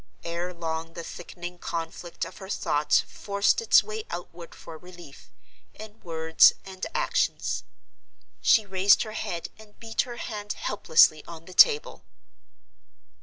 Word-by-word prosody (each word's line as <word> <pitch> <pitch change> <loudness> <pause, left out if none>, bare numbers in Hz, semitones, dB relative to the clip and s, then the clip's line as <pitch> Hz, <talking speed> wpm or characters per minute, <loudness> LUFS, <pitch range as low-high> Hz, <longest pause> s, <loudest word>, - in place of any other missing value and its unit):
Ere 170 +2 -4
long 165 -1 -5
the 170 - -7
thickening 175 +1 -9
conflict 165 +1 -5
of - - -11
her 190 -1 -10
thoughts 150 -6 +1
forced 200 - 0
its 460 - +5
way 435 0 -6
outward 175 -1 -8
for 165 - -11
relief, 175 -3 -14 0.5
in 215 0 -12
words 160 -1 +4
and 190 -1 -6
actions. - - 0 0.8
She 220 - +4
raised 195 +1 +4
her 215 - -8
head 170 -5 -5
and 210 -1 -17
beat 225 -1 -1
her 240 -2 -7
hand 210 -3 -5
helplessly 155 -6 +3
on 165 -1 -11
the 185 - -12
table. 450 - +4
180 Hz, 135 wpm, -26 LUFS, 165-210 Hz, 0.8 s, its